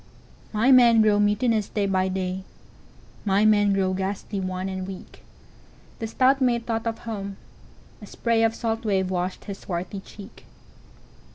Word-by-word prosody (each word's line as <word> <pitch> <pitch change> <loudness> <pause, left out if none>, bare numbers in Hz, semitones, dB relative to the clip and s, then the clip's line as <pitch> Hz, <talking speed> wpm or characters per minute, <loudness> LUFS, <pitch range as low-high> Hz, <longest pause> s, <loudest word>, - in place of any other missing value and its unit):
'""My 230 +5 +3
men 235 -3 +7
grow 210 -1 +3
mutinous 210 +1 +1
day 205 -2 -1
by 190 -1 +1
day; 190 0 -3 0.8
My 200 +1 +2
men 205 -1 +4
grow 190 -1 +1
ghastly 195 +1 -3
wan 185 0 -3
and 190 -1 -4
weak."The 195 +3 -12
stout 265 +4 +2
mate 240 -2 +1
thought 225 0 -2
of 225 0 -2
home; 200 -4 -6 0.6
a - - -9
sprayOf 225 -1 +1
salt 225 -1 -2
wave 190 -3 0
washed 180 0 -3
his 200 -2 -7
swarthy 180 +2 -5
cheek. 200 +1 -13
205 Hz, 145 wpm, -24 LUFS, 190-225 Hz, 0.8 s, men